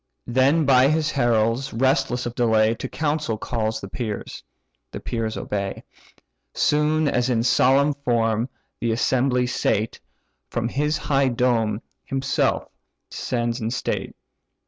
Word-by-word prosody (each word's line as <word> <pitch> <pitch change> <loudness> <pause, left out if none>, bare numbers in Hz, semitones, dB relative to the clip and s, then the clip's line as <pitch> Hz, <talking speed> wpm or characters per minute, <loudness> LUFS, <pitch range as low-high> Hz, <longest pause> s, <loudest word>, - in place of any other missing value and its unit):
Then 135 +6 +3
by 130 -1 +5
his 155 +1 +1
heralds, 120 0 +1
restless 125 0 +1
of 120 - -3
delay, 110 -2 +3
To 130 +3 -6
council 150 -7 -1
calls 110 -1 -2
the 100 - -7
peers: 105 +1 -5 0.5
the - - -6
peers 115 -2 -3
obey. 100 -1 -3 0.7
Soon 150 +1 +2
as 125 -2 +1
in 115 -2 +1
solemn 135 +4 +4
form 115 -3 0 0.3
the 115 - 0
assembly 125 +2 +1
sate, 110 -3 -1 0.5
From 115 0 -2
his 150 +4 0
high 140 -2 +1
dome 115 -3 +1 0.2
himself 135 0 0 0.4
descends 120 0 -2
in 110 - -1
state. 130 - -3
125 Hz, 125 wpm, -23 LUFS, 115-135 Hz, 0.7 s, by